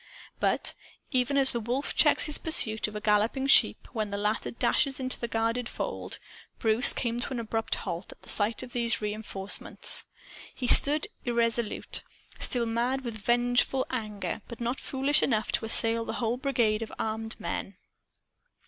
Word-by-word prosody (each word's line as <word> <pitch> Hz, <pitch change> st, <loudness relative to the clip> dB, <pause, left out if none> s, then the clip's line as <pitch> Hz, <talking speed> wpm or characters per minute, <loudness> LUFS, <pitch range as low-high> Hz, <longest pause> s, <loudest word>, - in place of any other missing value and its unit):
But -, -, 0 dB, 0.4 s
even 260 Hz, +1 st, 0 dB
as 270 Hz, -1 st, +5 dB
a 235 Hz, -, -1 dB
wolf 245 Hz, +5 st, -3 dB
checks -, -, +4 dB
his 300 Hz, -2 st, 0 dB
pursuit 220 Hz, -10 st, +4 dB
of 210 Hz, -, -10 dB
a -, -, -3 dB
galloping 215 Hz, +5 st, 0 dB
sheep 275 Hz, -, +4 dB
when 215 Hz, -3 st, -3 dB
the 200 Hz, -, -4 dB
latter 210 Hz, +2 st, -2 dB
dashes 270 Hz, +3 st, 0 dB
into 255 Hz, -1 st, -2 dB
the 235 Hz, -, -3 dB
guarded 230 Hz, +2 st, -2 dB
fold -, -, -6 dB, 0.4 s
Bruce 225 Hz, +3 st, +5 dB
came 235 Hz, -1 st, -2 dB
to -, -, -3 dB
an 255 Hz, -, -3 dB
abrupt 225 Hz, 0 st, -3 dB
halt, 170 Hz, +3 st, -6 dB
at -, -, -17 dB
sight 210 Hz, +2 st, 0 dB
of 250 Hz, -, -11 dB
these 235 Hz, -1 st, 0 dB
reenforcements. 210 Hz, -2 st, -2 dB, 0.5 s
He 255 Hz, -, -4 dB
stood 295 Hz, +4 st, +7 dB, 0.2 s
irresolute, 235 Hz, -2 st, -1 dB, 0.4 s
still 240 Hz, -2 st, +3 dB
mad 240 Hz, +4 st, -1 dB
with 235 Hz, -4 st, -6 dB
vengeful 245 Hz, +4 st, +1 dB
anger, 215 Hz, -4 st, -5 dB
but 235 Hz, -, -10 dB
not 240 Hz, +2 st, -3 dB
foolish 275 Hz, +2 st, 0 dB
enough 220 Hz, -4 st, 0 dB
to -, -, -1 dB
assail 230 Hz, +1 st, +3 dB
a -, -, -2 dB
whole 235 Hz, 0 st, -2 dB
brigade 240 Hz, -5 st, 0 dB
of 225 Hz, -, -6 dB
armed 220 Hz, 0 st, -5 dB
men. 195 Hz, -, -5 dB
235 Hz, 165 wpm, -27 LUFS, 220-255 Hz, 0.5 s, stood